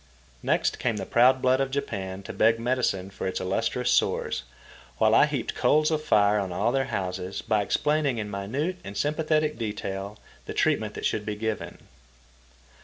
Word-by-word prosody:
Next - - 0
came 115 -3 0
the 95 - -4
proud 125 +4 +4
blood 130 +1 +3
of 135 - 0
Japan 100 -8 -4
to - - -7
beg 115 +1 +3
medicine 115 -6 -1
for 95 - -4
its 95 - -2
illustrious 95 +1 0
sores, - - +1 0.6
while - - +4
I - - +6
heaped - - -3
coals 155 +1 +3
of 155 -1 0
fire 105 -6 +4
on 95 -2 -3
all 100 +7 +1
their 135 0 +1
houses 95 -4 -4
by 110 -2 +1
explaining 145 +5 +1
in 105 -2 -3
minute 130 - -2
and 100 0 -7
sympathetic 155 +2 0
detail 100 -2 -4 0.3
the - - -5
treatment - - +1
that - - -4
should 110 - 0
be 105 0 -3
given. 110 0 -5
110 Hz, 175 wpm, -26 LUFS, 100-135 Hz, 0.6 s, I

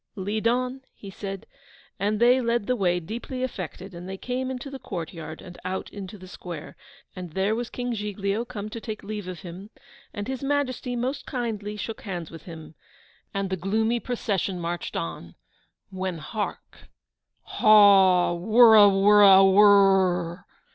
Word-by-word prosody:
'Lead 210 +3 -2
on!' 250 +2 -1
he 200 - -11
said; 195 +1 -7 0.5
and 210 +1 0
they 245 +2 +5
led 235 -2 0
the 250 - 0
way, 180 -5 +1
deeply 235 +8 -6
affected; 190 -5 -6
and 175 +2 -9
they 190 - -6
came 255 +4 -3
into 260 +1 -6
the 270 - -7
courtyard, 165 -4 -7
and 175 -1 -12
out 185 +1 -4
into 200 0 -8
the 185 -1 -13
square, 175 -4 -9 0.4
and 180 -4 -8
there 195 +4 0
was 235 +1 -3
King 245 -1 -4
Giglio 210 0 -2
come 220 -4 -7
to 230 - -7
take 220 -2 -7
leave 210 -2 -6
of 180 -3 -7
him, 185 +3 -10 0.4
and 205 0 -6
His 265 -1 -4
Majesty 275 -3 -1
most 260 +4 -3
kindly 220 -5 -4
shook 225 +1 -6
hands 175 -6 -6
with 165 - -12
him, 160 -3 -10 0.6
and 195 -1 -3
the - - +1
'Take 220 +7 -1
off 245 - -4
that 200 -3 0
marched 175 0 -4
on: 85 0 -5 0.6
when 185 -2 -4
hark! 205 +7 -6 0.6
Haw 195 -4 +5
wurraw 215 +3 +7
wurraw 195 0 +6
aworr! 195 -3 +4
200 Hz, 160 wpm, -25 LUFS, 185-230 Hz, 0.6 s, wurraw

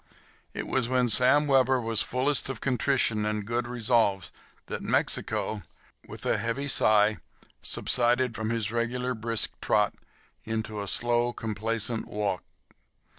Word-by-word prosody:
It - - -4
was 125 -2 0
when 125 -1 +2
Sam 130 +6 +5
Webber 130 -2 +3
was 115 -2 0
fullest 130 +2 0
of 130 -4 -5
contrition 125 -4 +1
and 105 -1 -2
good 120 +2 -2
resolves 115 -5 +1 0.3
that - - -5
Mexico, 110 -1 0 0.5
with - - -10
a - - +1
heavy 115 +5 -2
sigh, 110 -4 +3 0.4
subsided 125 0 +2
from 110 0 -3
his 115 -2 -1
regular, 125 +2 -1
brisk 115 -2 -2
trot - - +2 0.5
into 110 -1 -4
a 100 - -5
slow 120 +3 +2
complacent 115 +1 -3
walk. 100 -3 -2
115 Hz, 130 wpm, -27 LUFS, 110-125 Hz, 0.5 s, Sam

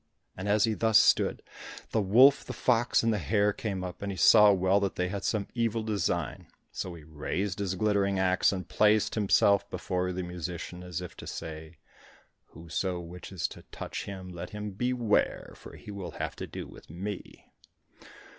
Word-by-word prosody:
And 95 +2 -4
as 105 0 +4
he 115 - +2
thus 110 0 +4
stood, 115 - +3 0.5
the 110 - +2
wolf, 125 +8 +6
the - - -7
fox, 120 -1 +2
and 115 -1 +2
the 105 - -1
hare 105 +4 +2
came 100 -4 -4
up, 90 -1 -7
and 100 0 -3
he 95 - -6
saw 105 0 +7
well 95 +1 +3
that 100 -1 -2
they 90 0 -1
had 100 +1 -4
some 105 -3 -1
evil 115 -2 0
design. 90 -8 -2 0.2
So 90 -2 -5
he 80 - -12
raised 85 +5 -3
his 95 -2 -1
glittering 100 -1 +1
axe 95 -1 +3
and 95 -2 -4
placed 105 0 +3
himself 100 -1 +3
before 90 0 -2
the 90 0 -3
musician, 90 0 -6
as 90 -1 -5
if 90 - -8
to - - -9
say, 80 0 -7 0.7
"Whoso 90 +2 -4
wishes 90 +1 -5
to - - -11
touch - - -6
him 95 -2 -7
let 85 -1 -7
him 105 -1 -5
beware, 120 +1 0
for - - -12
he - - -10
will 100 -3 -6
have - - -3
to - - -5
do - - -7
with - - -15
me!" 95 +4 -7
100 Hz, 185 wpm, -29 LUFS, 90-105 Hz, 0.7 s, saw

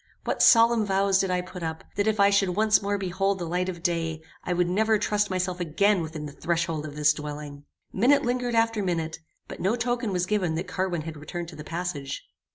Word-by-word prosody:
What - - -1
solemn 230 -1 +6
vows 195 -1 +2
did 195 - +1
I 180 0 +1
put 180 0 -9
up, 160 -1 -4
that 205 +1 0
if 215 -1 +1
I 200 0 +6
should 195 -3 +2
once 215 +1 +4
more 200 0 -1
behold 195 +1 0
the 175 - -4
light 180 +2 -1
of 170 -2 -7
day, 165 -2 -1 0.2
I - - -3
would 180 0 +2
never 215 +4 +2
trust 210 0 0
myself 185 -1 -2
again 180 +4 +2
within 160 -1 -5
the 145 - -7
threshold 165 0 -2
of 145 - -9
this 150 0 +4
dwelling! 145 -1 -7 0.3
Minute 255 +8 +4
lingered 245 -1 -1
after 225 -1 +2
minute, 165 -4 -2 0.3
but - - -9
no 195 +6 +1
token 240 -2 -1
was 180 -1 0
given 180 -5 0
that 175 +3 -3
Carwin 180 -3 -2
had 160 -1 -7
returned 170 +3 -6
to 165 - -11
the 150 - -8
passage. 165 -5 -4
180 Hz, 220 wpm, -26 LUFS, 165-205 Hz, 0.3 s, solemn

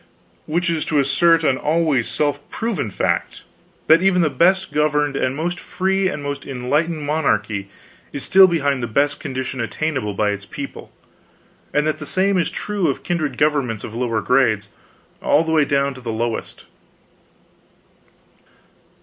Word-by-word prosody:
Which 170 +3 0
is 165 -2 0
to 155 - 0
assert 165 +4 +3
an 135 -4 +2
always 150 -5 +1
self 145 -1 0
proven 225 - -2
fact: - - -2 0.4
that 160 +2 +6
even 185 -2 +3
the 155 - +1
best 185 +8 +2
governed 150 -1 +1
and 130 -1 0
most 175 +4 -3
free 190 +1 0
and 150 -5 -4
most 140 0 -4
enlightened 145 +5 -1
monarchy 110 -10 -1 0.4
is 140 - -5
still 190 0 +7
behind 140 -6 0
the 120 - -2
best 145 +6 +1
condition 130 -1 -4
attainable 115 -1 -2
by 105 +1 +1
its 100 0 -6
people; 140 -2 -8 0.8
and 150 0 +1
that 155 - -1
the 155 - -7
same 190 +2 +2
is 170 - 0
true 205 -4 -2
of 140 - -2
kindred 160 -4 -2
governments 140 -8 0
of 110 - -7
lower 115 -2 -1
grades, 110 -6 +2 0.5
all 150 - +3
the 160 - -3
way 155 -2 +4
down 140 0 +1
to 130 - -12
the 120 -2 -4
lowest. 115 +1 -4
145 Hz, 160 wpm, -20 LUFS, 130-165 Hz, 0.8 s, still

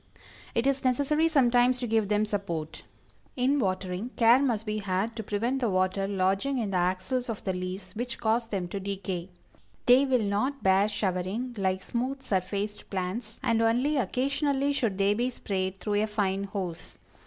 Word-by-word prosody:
It 230 - +1
is 275 0 +1
necessary 285 +5 +2
sometimes 250 -4 +4
to 250 - -3
give 220 -2 +1
them 210 +1 +2
support. 170 -7 -4 0.5
In 270 +3 +2
watering, 185 0 -2
care 235 +1 +6
must 230 -6 0
be 215 0 -2
had 200 +3 -1
to 225 - -3
prevent 230 +6 -1
the 240 -4 +1
water 185 +1 +1
lodging 195 +7 +1
in 220 -5 -1
the 185 - +1
axils 185 +8 -1
of 225 - -4
the 190 - -1
leaves, 185 +1 -5
which 240 +1 -3
cause 225 +1 +1
them 195 -5 -2
to 200 - -4
decay. 190 -2 -4 0.6
They 255 +3 +6
will 255 -4 +2
not 235 +8 -1
bear 195 +2 +4
showering 205 +5 -2
like 190 -2 -1
smooth 260 +3 -3
surfaced 200 0 -2
plants, 195 +4 -4
and 230 -1 +2
only 245 +6 +2
occasionally 275 +4 0
should 225 -8 0
they 200 +1 +3
be 240 +4 0
sprayed 190 -5 -3
through 205 +1 0
a 215 - +1
fine 200 -2 -1
hose. 190 -4 -5
210 Hz, 175 wpm, -28 LUFS, 190-250 Hz, 0.6 s, care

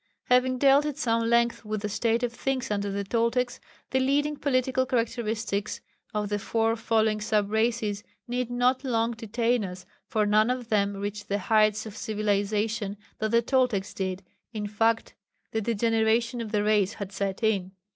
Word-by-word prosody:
Having 255 +1 +4
dealt 275 +2 +5
at 295 - -4
some 230 -1 +1
length 235 0 +2
with 215 -1 -3
the - - 0
state 230 +3 0
of 240 -1 -1
things 260 -1 -2
under 205 -1 -1
the 200 0 -2
Toltecs, 235 +4 0 0.3
the 260 - +2
leading 290 +3 +1
political 260 -2 +1
characteristics 225 -4 -1 0.3
of 210 -1 -2
the 205 0 -1
four 225 +2 +1
following 220 -1 +1
sub 210 -1 +1
races 220 -2 0 0.2
need 245 0 -2
not 250 +2 +1
long 230 -3 +1
detain 230 +1 0
us, 180 -1 -7 0.2
for 215 -1 +1
none 215 +2 +4
of 250 -2 -2
them 200 -2 +1
reached 205 +1 -5
the 200 - +1
heights 215 +1 +2
of 215 -2 -8
civilization 210 0 -1 0.2
that 220 - 0
the 235 +1 +3
Toltecs 250 -6 +1
did 190 0 -3 0.3
in 215 -3 -4
fact 225 +2 +1 0.4
the 220 - -1
degeneration 230 +2 +1
of 220 -2 -6
the 210 -2 +1
race 210 -1 +2
had 200 -2 -6
set 195 +2 -3
in. 195 -4 +1
225 Hz, 170 wpm, -27 LUFS, 205-240 Hz, 0.4 s, dealt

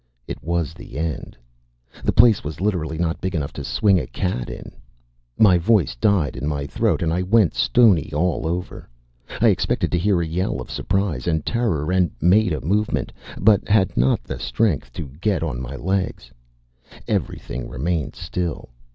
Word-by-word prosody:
It - - -7
was 85 -2 -1
the 80 -5 -10
end. 80 -1 -4 0.7
The - - +2
place 115 -3 +5
was 75 0 -6
literally 90 -5 -1
not 85 0 -1
big 95 -1 -2
enough 75 -4 -2
to - - -6
swing 100 -3 +2
a - - -5
cat 90 -11 -3
in. - - -8 0.7
My 95 -5 +6
voice 90 - +2
died 80 - +1
in 70 +2 -4
my 70 -2 -2
throat 70 - 0
and 80 -1 0
I 90 - 0
went 100 0 +3
stony 105 - +4
all 80 +2 0
over. 90 -4 -4 0.5
I - - +5
expected - - 0
to 85 - +1
hear 95 0 +2
a 85 - 0
yell 85 -2 -2
of 65 - -8
surprise 95 -8 -1
and 80 -3 0
terror, 100 -10 0
and 90 -2 +3
made 95 +5 +4
a 75 - -2
movement, 105 +7 -1 0.2
but 105 0 +3
had 100 -3 +2
not 65 +2 +2
the - - -6
strength 85 - 0
to - - -5 0.2
get 100 -4 +1
on - - -3
my 65 +2 -6
legs. 90 -7 -2 0.8
Everything - - -3
remained 80 +2 -2
still. 85 -7 -4
85 Hz, 175 wpm, -22 LUFS, 75-95 Hz, 0.8 s, My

